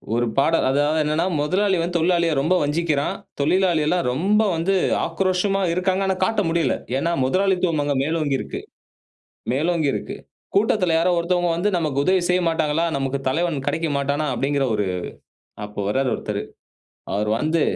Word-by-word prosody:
ஒரு 120 - +1
பாடல். 165 +4 +3
அதாவது 145 +3 +1
என்னன்னா, 155 +3 0
முதலாளி 190 +6 +1
வந்து 175 +1 -1
தொழிலாளிய 170 0 +2
ரொம்ப 165 +6 +1
வஞ்சிக்கிறான். 150 -1 0 0.3
தொழிலாளியெல்லாம் 175 -1 +2
ரொம்ப 200 +11 +2
வந்து 175 +4 0 0.3
ஆக்ரோஷமா 185 +3 0
இருக்காங்க. 185 +2 0
ஆனா 190 - +1
காட்ட 215 +1 0
முடியல. 165 -5 +1 0.2
ஏன்னா 170 +5 0
முதலாளித்துவம் 180 0 +1
அங்க 145 -1 -1
மேலோங்கி 155 -3 0
இருக்கு. - - -6 0.9
மேலோங்கி 160 +1 +1
இருக்கு. - - -4 0.4
கூட்டத்துல 200 -4 +2
யாரோ 175 +2 +2
ஒருத்தவங்க 175 0 +1
வந்து 190 +5 0
நமக்கு 145 -4 0
உதவி 185 -1 +3
செய்யமாட்டாங்களா! 165 -2 +1
நமக்குத் 135 0 -2
தலைவன் 155 -2 -1
கிடைக்க 165 0 0
மாட்டானா! 140 +2 -1
அப்படிங்கிற 140 +3 0
ஒரு 105 -1 0 0.8
அப்ப 105 0 -11
வர்றாரு 130 +3 +1
ஒருத்தரு. - - -4 0.7
அவர் 105 +1 -1
வந்து, 155 +3 +1
165 Hz, 140 wpm, -22 LUFS, 145-180 Hz, 0.9 s, பாடல்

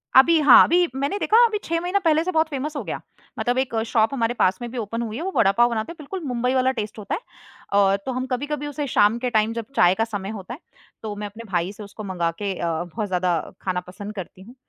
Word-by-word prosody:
अभी 315 +5 +7
हाँ, 285 -4 +9
अभी 350 +2 +3
मैंने 280 +9 -1
देखा 435 - +3
अभी 435 -2 0
6 335 0 -1
महीना 365 +3 0
पहले 320 -3 +2
से 370 - -2
बहुत 315 -1 +2
फ़ेमस 295 +2 -4
हो - - -3
गया, - - -4 0.4
मतलब 245 +1 0
एक 260 -2 -1
शॉप 225 +2 +2
हमारे 235 -2 0
पास 185 0 +3
में 240 - -4
भी 255 - -7
ओपन 230 +1 -3
हुई 225 -1 -4
है 320 - -4
वो 380 - -2
वड़ापाव 230 +2 +4
बनाते 225 +7 -3
हैं, - - -9
बिल्कुल 365 +6 -6
मुंबई 250 +1 0
वाला 260 0 +3
टेस्ट 215 0 -5
होता 205 - -3
है। - - -6 0.5
अ, 200 -1 +4
तो 260 - -2
हम 255 +1 -2
कभी-कभी 290 +3 -3
उसे 290 0 -4
शाम 210 -2 +3
के 250 - -1
टाइम 220 -1 +1
जब 230 -1 -4
चाय 175 +1 +5
का 225 - +1
समय 205 -3 -5
होता 195 +5 -8
है, 270 - -9 0.4
तो 215 -2 -5
मैं 205 0 -5
अपने 220 +3 -10
भाई 175 0 0
से 210 0 -10
उसको 205 +2 -9
मँगा 175 -4 -1
के 200 -1 -1
अ, 170 - -1 0.2
बहुत 205 +5 -4
ज़्यादा 180 -2 +1 0.2
खाना 185 -1 -1
पसंद 205 +3 -8
करती 185 -1 -8
हूँ, 235 +6 -14
235 Hz, 255 wpm, -23 LUFS, 205-285 Hz, 0.5 s, हाँ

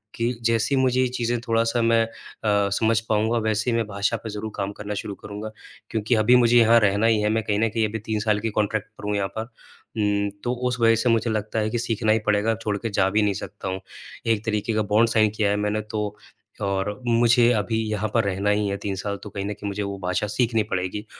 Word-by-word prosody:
कि 115 +1 0
जैसे 115 +3 +2
ही 130 - +3
मुझे 130 0 +2
ये 130 - +3
चीजें 120 -1 -1
थोड़ा-सा 115 +1 +1
मैं 115 0 +4
अ, 115 - -11 0.6
समझ 110 +2 +2
पाऊँगा 110 +2 +2
वैसे 110 +2 0
ही - - +1
मैं 115 - 0
भाषा 100 -1 -1
पे 110 - -5
ज़रूर 105 +1 -5
काम 100 0 -2
करना 105 0 -4
शुरू 100 -2 -6
करूँगा। 105 +1 -7 0.4
क्योंकि 110 +2 0
अभी 110 +3 +5
मुझे 120 -1 +5
यहाँ 115 0 +6
रहना 100 0 +2
ही 110 -2 +3
है। 105 - +1
मैं 110 0 0
कहीं 105 -1 0
न 115 - +3
कहीं 110 0 0
अभी 110 +1 -4
3 110 -1 -1
साल 105 -1 +1
की 115 +1 -2
कॉन्ट्रैक्ट 105 0 -1
पर - - -12
हूँ 105 - 0
यहाँ 100 -1 0
पर। - - 0
उम, 105 -3 -3
तो 125 0 0
उस 125 0 -2
वजह 115 -1 +5
से 115 +2 +1
मुझे 115 0 +2
लगता 110 0 -2
है 110 - 0
कि 120 - -2
सीखना 115 -2 0
ही 110 - +3
पड़ेगा, 105 +2 +2
छोड़ 105 -2 -2
के 115 - -4
जा 95 -2 +2
भी 105 +2 +2
नहीं 105 -1 +2
सकता 100 +1 -7
हूँ। 95 0 -2 0.5
एक 110 -2 +1
तरीके 110 0 -1
का 110 - +1
बॉन्ड 115 +2 +5
साइन 110 -2 +3
किया 105 -2 +1
है 100 - +2
मैंने 105 +1 -1
तो 105 -1 -1 0.6
और 100 +2 -2
मुझे 120 +1 +4
अभी 110 +1 0
यहाँ 105 0 -1
पर 115 - +3
रहना 100 +1 -1
ही 105 0 +2
है 100 0 -2
3 100 -1 -4
साल 100 +1 -3
तो 105 - -7
कहीं 100 0 -5
न 105 - -2
कहीं 105 0 -7
मुझे 100 +1 -3
वो 100 0 -4
भाषा 90 +2 -1
सीखनी 110 +1 +1
पड़ेगी 95 +3 -2
110 Hz, 250 wpm, -24 LUFS, 105-115 Hz, 0.6 s, यहाँ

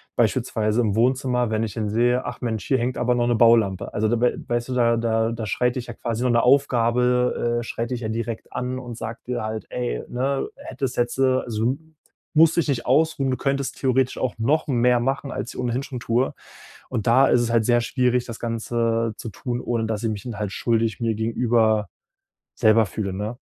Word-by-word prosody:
beispielsweise 110 +2 +1
im 105 -3 0
Wohnzimmer, 125 0 +1
wenn 110 +1 0
ich 110 - -3
dann 110 -2 -2
sehe: 120 +3 +2
„Ach - - -6
Mensch, 110 -7 -3
hier 130 - +3
hängt 125 +1 -2
aber 125 0 +2
noch 120 - +1
'ne 120 - +3
Baulampe.” 115 -5 +3
Also, 110 +1 +1
da 120 +1 0
w 125 - +3
weißt 120 +1 -1
du, - - -2
da 115 -1 +3
da 115 0 +1
da 115 -1 -4
schreit 125 +3 0
dich 125 -2 -4
ja 120 - -6
quasi 115 0 -3
nur 125 - +2
'ne 120 0 +3
Aufgabe 125 -2 +2
äh, - - -6
schreit 115 +1 -4
dich 125 -1 -3
ja 110 - -3
direkt 115 0 -4
an 125 +1 -3
und 120 -2 -8
sagt 115 -1 -7
dir 125 -2 -2
halt: 110 -1 -4
„Ey, - - -3
ne, 135 +2 -1
hättest 130 -2 -4
jetzt 120 +1 0
äh, 130 -1 +3
so 115 +3 0 0.6
musst 160 +1 +6
dich 165 - +2
nicht 125 -4 -1
ausruhen. 140 -1 +2
Du 130 - -1
könntest 140 -1 -2
theoretisch 130 -1 +1
auch 130 - -1
noch 150 +8 +1
mehr 125 -2 +3
machen.” 135 +2 -2
als 120 - -5
ich - - -7
ohnehin 125 +1 -1
schon 130 -3 -6
tue. 120 +3 0 0.6
Und 115 -4 -3
da 130 +4 +6
ist 120 - +4
es 120 -1 -1
halt 115 -2 +2
sehr 120 -1 +3
schwierig, 125 0 +1
das 115 -2 -8
Ganze 115 -1 -1
zu 115 - -6
tun, 120 +5 -4
ohne 115 -2 -1
dass 110 -1 -3
ich 115 - 0
mich 105 -2 -5
dann 115 -5 -6
halt 105 -2 -2
schuldig 115 -3 0
mir 115 -2 0
gegenüber 110 -2 +1 0.7
selber 110 0 +4
fühle, 100 0 -4
ne? 105 +5 -4
120 Hz, 215 wpm, -23 LUFS, 115-125 Hz, 0.7 s, musst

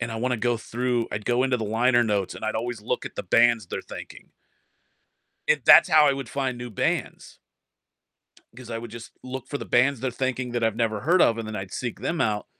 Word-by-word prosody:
and 120 0 -3
I 115 - -4
wanna 125 +2 -1
go 120 +1 +1
through 120 +1 -2
I'd 105 0 -4
go 120 +1 +2
into 130 -1 +1
the 110 - -4
liner 120 +3 +2
notes, 105 -4 -1
and - - -8
I'd 110 0 -1
always 115 -1 -4
look - - -2
at - - -9
the - - -4
bands 120 -4 +3
they're - - -5
thanking. - - -11 1.2
It - - +2
that's - - +8
how 155 -1 +6
I 140 - +4
would 135 -3 -5
find 130 -2 -3
new 120 0 -7
bands. 105 - -3 1.2
'Cause 125 -2 -11
I 115 - -3
would 115 0 -8
just 115 0 -10
look 130 0 -7
for 145 - -4
the - - -6
bands 130 +1 +2
they're 130 0 -1
thanking 130 0 -3
that 120 -1 0
I've 110 -1 +1
never 110 -3 -1
heard 170 +7 +3
of, 115 0 +3
and 115 - -4
then 110 - -6
I'd 95 -2 -6
seek 120 -2 -5
them 165 0 -2
out, 105 -2 0
120 Hz, 235 wpm, -25 LUFS, 110-130 Hz, 1.2 s, that's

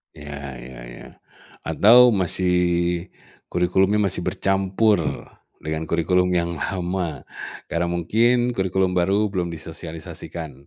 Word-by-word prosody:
Iya 75 -1 -8 0.3
iya 65 -1 -10
iya, - - -11 0.6
atau 120 +4 +6
masih 95 -2 +1 1.0
kurikulumnya 95 +4 +2
masih - - -1
bercampur 95 +2 +2 0.6
dengan 80 0 -3
kurikulum 90 +3 +1
yang 85 -1 +1
lama, 90 -3 -3 0.5
karena 85 +1 0
mungkin 115 +8 +2
kurikulum 95 -2 0
baru 100 +4 +2
belum 90 -3 -1
disosialisasikan. 80 -3 -8
90 Hz, 100 wpm, -22 LUFS, 85-95 Hz, 1.0 s, atau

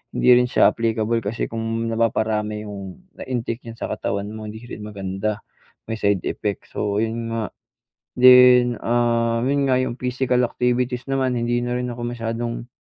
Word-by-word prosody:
hindi - - +2
rin 125 0 +4
siya - - +5
applicable 115 0 0
kasi 105 +3 -2
kung 115 0 -2
napaparami 110 -2 0
yung 100 - -8 0.2
na-intake 120 -2 -4
diyan 115 -1 -8
sa - - -4
katawan 100 +1 -3
mo, 110 0 -7
hindi 110 +1 -8
rin 110 -3 -8
maganda, 100 +1 -3 0.5
may 110 - -2
side 100 -3 +1
effects, 105 -2 -3
so 105 0 -1
yun 115 +1 -2
nga. 115 -2 -2 0.7
Then, 125 -1 +7
ah, 115 -1 +1
yun 140 +1 +1
nga, 130 - +4
yung 120 - -2
physical 125 0 +1
activities 125 +1 -1
naman, 130 -2 0
hindi 120 +1 0
na 120 0 -2
rin 125 - -2
ako 120 - -8
masyadong, 115 0 -4
115 Hz, 165 wpm, -22 LUFS, 110-125 Hz, 0.7 s, Then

